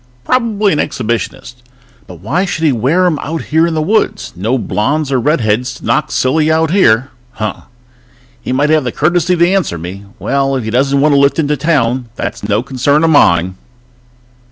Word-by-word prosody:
Probably 215 - +1
an 150 - -1
exhibitionist... 120 +1 -3 0.5
But - - -12
why 175 +7 -1
should 175 -4 -3
he 155 - +4
wear 135 +10 +1
'em 165 -5 +1
out 160 +2 -4
here 160 +1 +4
in 165 - -2
the 155 - 0
woods? 210 +2 -1
No 110 +8 -1
blonds 140 +6 -1
or 130 - +2
redheads 125 -3 0
to - - -12
knock 155 - 0
silly 155 +4 +1
out 160 0 +1
here!_ 130 - +3 0.3
_Huh! 110 0 -4 0.8
He - - -5
might 145 +4 +1
have 155 -2 +3
the 125 - -2
courtesy 175 +5 +1
to 170 0 +3
answer 185 - 0
me... 90 +5 -8
Well, 135 0 -1
if 130 - -2
he 110 - -4
doesn't 135 +3 +1
want 150 +1 +3
a - - +4
lift 140 0 +3
into 150 -2 +1
town 130 -5 0
it's - - -4
no 105 +2 0
concern 140 +3 +1
of 165 - +3
mine! 90 - +3
140 Hz, 190 wpm, -14 LUFS, 120-160 Hz, 0.8 s, he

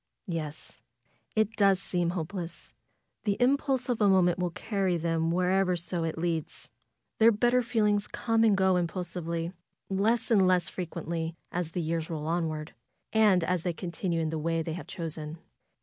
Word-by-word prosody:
"Yes, 160 -5 -6 0.5
it 220 0 +1
does 195 -3 +4
seem 175 -3 -1
hopeless. 175 +1 -6 0.5
The 205 -2 0
impulse 265 0 +2
of 245 -3 -1
a 205 - +5
mo 190 -1 +5
ment 175 0 +1
will 180 -1 0
carry 195 -1 -1
them 165 0 0
wheresoever 180 -1 +1
it 160 - -4
leads. 165 -2 -3 0.5
Their 225 +1 +7
bet 240 +3 +2
ter 250 0 +4
feelings 210 -4 +1
come 225 -1 +1
and 215 -3 +4
go 190 -1 +4
impulsively, 170 -1 -3 0.4
less 225 +5 +1
and 195 -4 +5
less 180 -1 +3
fre - - -5
FAITH 175 - -4
^28 170 - -7
quently 165 -1 -3 0.2
as 175 -2 -2
tlie 175 -3 -2
years 165 0 -2
roll 155 -2 -4
onward; 160 -1 -2 0.4
and 210 -5 +5
as 180 0 0
they 175 0 -1
continue 170 0 -2
in 160 -1 -1
the 160 - -2
way 165 +1 0
they 160 - -4
have 175 - -7
chosen. 160 -2 -5
180 Hz, 180 wpm, -29 LUFS, 165-205 Hz, 0.5 s, Their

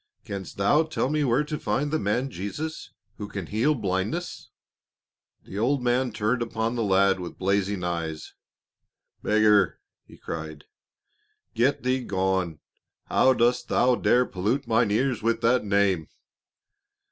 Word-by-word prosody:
"Canst 100 -2 -7
thou 100 +10 +4
tell 160 -4 -2
me 150 -1 +1
where 130 +2 +2
to 150 0 -5
find 145 +1 -1
the 155 - +1
man 125 +7 -1
Jesus, 145 - -5 0.3
who 105 - -5
can 100 -3 -6
heal 120 - +1
blindness?" 105 - -3 0.9
The 100 - -7
old 130 +3 +1
man 125 +1 +1
turned 110 +3 -1
upon 115 0 -2
the 120 - -2
lad 95 -2 +3
with 90 -1 -7
blazing 100 0 0
eyes. 85 -3 -4 0.9
"Beggar!" 105 -1 +3 0.3
he - - -15
cried, 80 -2 -7 0.9
"get 125 +5 +1
thee 130 0 0
gone! 95 -6 -1 0.5
How 130 - +4
dost 120 0 +1
thou 125 +1 +3
dare 125 +1 +3
pollute 110 +10 -1
mine 110 -2 +2
ears 120 +3 0
with 115 +1 0
that 125 +2 +3
name?" 100 -5 +1
110 Hz, 140 wpm, -26 LUFS, 95-125 Hz, 0.9 s, thou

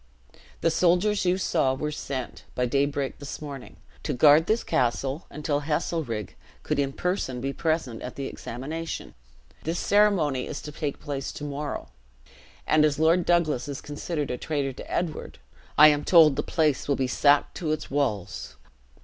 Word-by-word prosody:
"The 165 - +3
soldiers 185 +5 +2
you 180 +1 +3
saw 155 -8 +1
were 150 +3 -3
sent, 135 -4 -5
by 125 - +1
daybreak 140 +1 0
this 145 0 -7
morning, 140 -4 -8 0.3
to 150 - -2
guard 150 +5 +6
this 220 +2 +1
castle 135 +1 -1
until 150 -1 -1
Heselrigge 150 - -2 0.3
could 150 -2 -1
in 140 -1 +1
person 155 -6 -2
be 135 +2 -3
present 155 -9 -1
at 125 - -7
the 140 - -4
examination. 150 +8 -6 0.5
This 165 +2 -2
ceremony 185 -12 +2
is 150 - -5
to 150 - -6
take 145 -1 -4
place 140 -2 -4
to - - -8
morrow; 145 0 -4 0.8
and 155 -1 +4
as 150 -2 +2
Lord 165 +3 +3
Douglas 155 -7 +2
is 140 -2 -5
considered 150 0 -4
a 125 - -4
traitor 140 -4 -2
to - - -10
Edward, 170 -3 -3 0.4
I 150 +1 +10
am 145 -1 +1
told 160 -5 +6
the - - 0
place 155 -4 0
will 140 - +2
be 135 - 0
sacked 145 +3 +3
to 160 -3 -2
its 155 -3 -3
walls. 130 -10 -2
150 Hz, 165 wpm, -26 LUFS, 135-160 Hz, 0.8 s, I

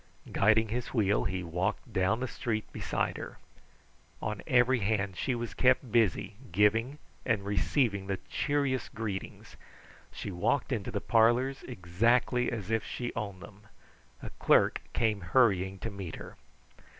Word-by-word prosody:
Guiding 110 +2 +3
his 120 +3 -4
wheel, 105 +1 +2
he 95 -2 -2
walked 90 +5 -3
down 100 +4 +1
the 130 - -1
street 110 -3 -3
beside - - -2
her. - - -8 0.8
On 105 -2 -4
every 125 0 +4
hand 100 -2 0
she 125 +7 -1
was 120 0 -4
kept 130 -1 +2
busy 105 -3 +1
giving 110 - +2 0.3
and 105 -5 0
receiving 100 - 0
the 95 -1 -1
cheeriest 140 -3 -1
greetings. 105 -4 -6 0.5
She 100 - -6
walked 120 +11 0
into 110 -6 -2
the 100 - -3
parlors 120 +4 +3
exactly 120 +4 +1
as 110 -3 -4
if 110 -1 +1
she 120 -1 -5
owned 100 -4 -5
them. 105 0 -14 0.6
A - - -6
clerk - - +4
came 110 -3 +1
hurrying 95 -1 +2
to 110 +4 -5
meet 95 -5 -6
her. - - -10
110 Hz, 145 wpm, -30 LUFS, 100-120 Hz, 0.8 s, every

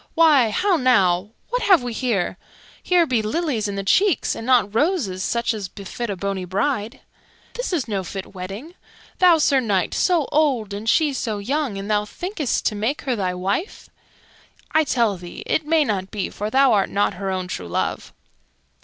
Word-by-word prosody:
"Why, 300 -8 +5
how 365 - +1
now! 195 - +3 0.2
What - - -1
have 370 -10 +4
we 245 -1 -4
here? 220 -7 -1 0.4
Here 355 -2 +3
be 250 -7 +1
lilies 230 -1 -1
in 200 - -4
the 195 - -3
cheeks, 380 - +2
and 225 - -7
not 240 -6 +3
roses 235 - 0
such 235 +1 0
as 205 -3 -5
befit 205 +5 -6
a 200 - -2
bonny 195 0 -3
bride. 210 +6 -2 0.5
This - - -4
is 320 -9 -1
no 200 -3 -2
fit 190 +2 -7
wedding. 195 - -7 0.5
Thou, 355 -3 +6
Sir 285 -3 +3
Knight, 205 -7 0
so 345 -6 +2
old, 260 -9 +1
and 210 +3 -3
she 300 0 +3
so 225 -5 -2
young, 260 +1 -2
and 195 +1 -5
thou 210 -1 +1
thinkest 325 - -3
to - - +2
make 220 +8 -2
her 260 -3 0
thy 185 -4 -2
wife? 195 - -3 0.8
I 315 0 +3
tell 230 -7 +1
thee 175 0 -9
it 300 - -1
may 315 -1 +3
not 195 -5 -2
be, 205 -4 -4
for 210 +1 -4
thou 265 +2 +4
art 200 -2 +2
not 205 0 +1
her 195 +1 -4
own 185 -1 -2
true 90 - -5
love." 85 - -3
225 Hz, 190 wpm, -22 LUFS, 195-295 Hz, 0.8 s, Thou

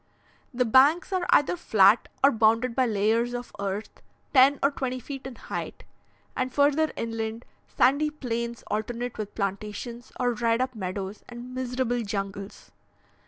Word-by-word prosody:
The 250 0 0
banks 280 - +4
are 365 -1 0
either 290 - +4
flat 215 - +4 0.2
or 275 - +7
bounded 230 +2 +2
by 260 -2 +2
layers 225 +3 +1
of 245 0 -6
earth 200 +2 -4 0.3
ten 275 +1 +6
or 280 - +4
twenty 255 -2 -3
feet 270 +1 -7
in 260 - -9
height, - - -6 0.5
and, 255 0 -1
further 290 +3 +2
inland, 225 0 -4 0.2
sandy 290 +3 +2
plains 235 -5 -4
alternate 230 +3 -3
with 210 -1 -5
plantations 210 +4 -4
or 245 -1 +1
dried 230 -1 +1
up 255 0 -1
meadows 195 -1 -5
and 245 +1 -9
miserable 250 -1 -1
jungles. 200 -1 -5
240 Hz, 145 wpm, -26 LUFS, 220-260 Hz, 0.5 s, or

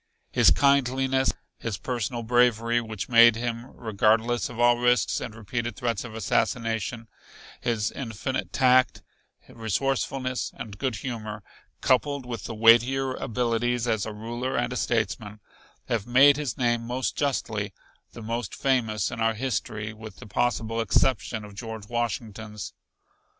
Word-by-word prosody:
His - - +5
kindliness, 135 -1 +3 0.3
his 110 -4 -3
personal 120 -1 -3
bravery 120 0 +3
which 110 -3 -5
made 115 -1 +7
him 120 +1 -3
regardless 110 +2 +1
of 120 -1 -9
all 120 0 +5
risks 125 -3 +2
and 110 - -6
repeated 115 +2 -4
threats 120 -4 -2
of 115 -3 -9
assassination, 115 0 -1 0.5
his 115 -4 -1
infinite 130 +1 -4
tact, 130 -1 +3 0.4
resourcefulness 130 +2 -2
and 105 -3 -8
good 130 -4 -1
humor, 110 -3 -5 0.4
coupled 135 +1 +1
with 120 -2 -6
the 115 - -5
weightier 120 +4 +5
abilities 120 0 -1
as 110 -3 0
a - - -4
ruler 120 +4 -4
and 120 0 0
a - - -5
statesman, 110 -3 -1 0.5
have 115 -2 -1
made 135 +4 +7
his 145 -5 -3
name 120 -2 +1
most 125 +2 -2
justly 110 -8 -1 0.4
the 115 - -9
most 115 -1 -3
famous 115 -7 0
in 115 - -5
our 115 0 +2
history 110 -3 -3
with 110 -2 -10
the 125 - -12
possible 115 +1 0
exception 115 -1 +1
of 105 - -12
George 110 0 -7
Washington's. 110 -3 -4
115 Hz, 140 wpm, -26 LUFS, 110-125 Hz, 0.5 s, made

